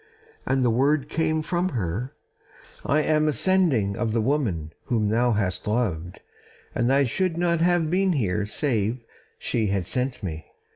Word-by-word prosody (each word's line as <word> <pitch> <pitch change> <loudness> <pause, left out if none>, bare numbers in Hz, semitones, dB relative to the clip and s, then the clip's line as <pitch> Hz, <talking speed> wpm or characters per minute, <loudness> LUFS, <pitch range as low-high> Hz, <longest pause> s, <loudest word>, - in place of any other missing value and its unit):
And 130 -1 +2
the 120 - +3
word 140 +4 +2
came 160 -1 0
from 175 +3 0
her: 105 +7 -3 0.7
"I 155 +2 +2
am 155 0 +2
a - - +3
sending 145 - +2
of 115 0 -1
the 115 - +2
woman 110 - -1
whom 110 -4 0
thou 120 +2 +2
hast 100 -3 -2
loved, 90 -7 -1 0.5
and 120 +2 +1
I 140 +1 +4
should 170 +7 0
not 170 -1 +1
have 175 -2 +2
been 190 0 +2
here 105 - 0
save 115 -2 -1 0.3
she 110 -3 -1
had 95 -2 -1
sent 125 +3 -3
me." 80 -4 -5
125 Hz, 160 wpm, -25 LUFS, 105-155 Hz, 0.7 s, I